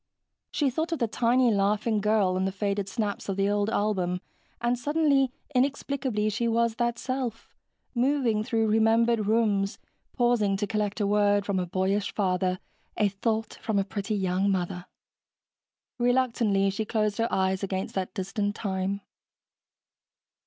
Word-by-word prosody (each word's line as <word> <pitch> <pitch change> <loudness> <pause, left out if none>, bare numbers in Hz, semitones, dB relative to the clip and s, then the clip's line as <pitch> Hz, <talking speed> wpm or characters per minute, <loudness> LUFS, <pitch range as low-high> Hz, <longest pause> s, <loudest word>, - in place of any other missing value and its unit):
She 285 -3 +1
thought 320 +6 -2
of 330 - 0
the 235 - 0
tiny, 240 +2 +3
laughing 210 +2 +1
girl 210 -3 +2
in 190 +1 0
the 190 - 0
faded 200 0 -2
snaps 205 -2 -3
of 195 - -2
the 195 0 +2
old 205 +1 +1
album 190 -5 0 0.4
and 240 +1 +1
suddenly, 280 0 +2 0.2
inexplicably, 260 -4 0
she 235 +3 -1
was 230 0 +1
that 235 -1 0
self, 255 -3 -4 0.4
moving 245 -4 +1
through 225 -1 +1
remembered 225 0 +3
rooms, 210 -3 +1 0.4
pausing 235 -5 +2
to 205 - -1
collect 210 0 -2
a - - +2
word 205 0 +3
from 200 -2 0
a 180 - -2
boyish 190 +3 0
father, 185 -2 +1 0.4
a 210 -2 +3
thought 220 +3 -2
from 220 -2 -1
a 195 - +3
pretty 200 +2 -3
young 190 0 +1
mother. 180 -1 -2 1.1
Reluctantly, 235 -5 +2
she 220 +3 -2
closed 215 -1 -1
her 230 - +1
eyes 190 0 +1
against 190 -1 -3
that 190 +1 -3
distant 205 +1 -2
time. 195 0 -2
210 Hz, 150 wpm, -27 LUFS, 195-235 Hz, 1.1 s, tiny